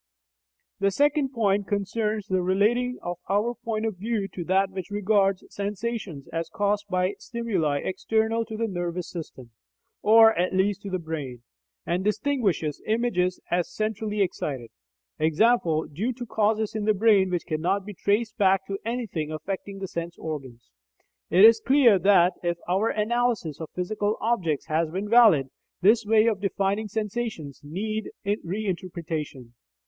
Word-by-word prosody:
The 200 0 +3
second 290 +5 +2
point 205 -5 0
concerns 210 +1 -1
the 185 -2 0
relating 220 +7 +1
of 175 0 -4
our 210 +5 +1
point 225 -2 -3
of 220 -4 -3
view 210 0 -2
to 175 0 -6
that 190 +2 +2
which 190 0 -6
regards 200 -1 +1
sensations 205 - -4
as 165 0 -3
caused 205 +3 -1
by 185 +1 +1
stimuli 190 -12 -1
external 220 +4 0
to 220 0 -7
the 230 0 0
nervous 175 -2 -3
system 130 -8 -8 0.5
(or 225 +1 +7
at 180 +2 0
least 195 +1 +1
to 200 - -6
the 185 - -1
brain), 150 -8 -6 0.4
and 175 +2 -1
distinguishes 210 - 0
images 215 -5 0
as 175 -1 0
"centrally 215 -1 -1
excited," 135 -9 -4 0.5
i.e. 155 - +3 0.6
due 220 - -1
to 245 0 -7
causes 220 -1 0
in 215 -1 -2
the 215 -1 +3
brain 200 -2 +4
which 175 -2 -2
cannot 180 +5 -1
be 210 - -7
traced 210 +4 0
back 190 -1 +3
to 195 0 -4
anything 220 -10 -3
affecting 195 +5 -5
the 195 0 -5
sense 170 -1 -5
organs. 130 - -7 0.6
It 185 +5 +7
is 225 0 +7
clear 260 -7 +5
that, 185 -1 +5
if 170 -1 -1
our 195 +6 +1
analysis 215 - -1
of 160 - -6
physical 205 +3 -1
objects 180 -11 0
has 160 0 0
been 190 +5 -4
valid, 210 - +5 0.3
this 215 +3 +4
way 220 0 +5
of 215 -4 +1
defining 200 +2 -1
sensations 210 - -4
needs 215 +8 -4 0.2
reinterpretation. 170 - -4
200 Hz, 150 wpm, -26 LUFS, 175-220 Hz, 0.6 s, or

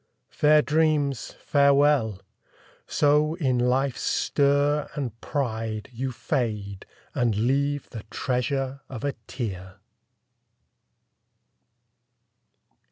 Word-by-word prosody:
Fair 150 0 +4
dreams, 150 -4 +1
farewell! 140 - +3 0.7
So 150 +2 +3
in 130 -8 0
life's 125 +2 +1
stir 145 +1 +1
and 120 -6 -4
pride 110 -5 -3
You 130 +2 -3
fade, 105 -7 -3 0.3
and 120 -4 +1
leave 140 +6 0
the 115 - -6
treasure 135 +2 -2
of 125 -4 -7
a 140 -1 0
tear! 95 -7 -5
135 Hz, 85 wpm, -25 LUFS, 115-145 Hz, 0.7 s, Fair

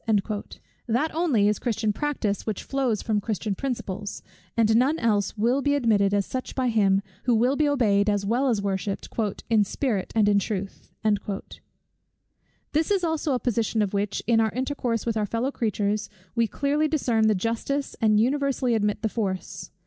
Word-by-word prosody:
That 245 +8 0
only 300 -11 +2
is 210 - +1
Christian 225 -3 0
practice, 230 -7 -2
which 215 -3 -2
flows 260 -6 -1
from 210 -2 0
Christian 210 -1 -2
principles; 205 -4 -4 0.3
and 220 -1 +4
none 265 +7 +3
else 215 -4 0
will 240 +6 +2
be 285 +1 +2
admitted 215 -7 +3
as 200 -1 +1
such 255 -1 -5
by 255 -2 +1
Him, 200 -3 +3 0.2
who 245 -2 +3
will 245 +5 +3
be 295 0 +2
obeyed 210 -7 +3
as 205 -1 0
well 245 +6 +1
as 220 -5 +1
worshipped 195 0 -2 0.4
"in 220 -2 +4
spirit 205 -1 -2
and 215 -2 +4
in 205 -1 +4
truth." 195 -1 -5 1.8
This 355 +5 +1
also 320 -3 0
is - - +2
a - - -1
position 230 -2 +1
of 200 - -3
which, 200 0 -1
in 230 -1 +3
our 220 0 +3
intercourse 255 -3 -2
with 230 -1 0
our 210 -1 0
fellow 230 +6 -1
creatures, 210 -3 -1 0.2
we 230 -1 +2
clearly 290 +5 0
discern 240 -8 +2
the 215 - +3
justice, 230 +8 -2
and 215 -1 +4
universally 270 0 +1
admit 210 -1 0
the - - +3
force. 195 -5 -4
225 Hz, 170 wpm, -25 LUFS, 205-260 Hz, 1.8 s, and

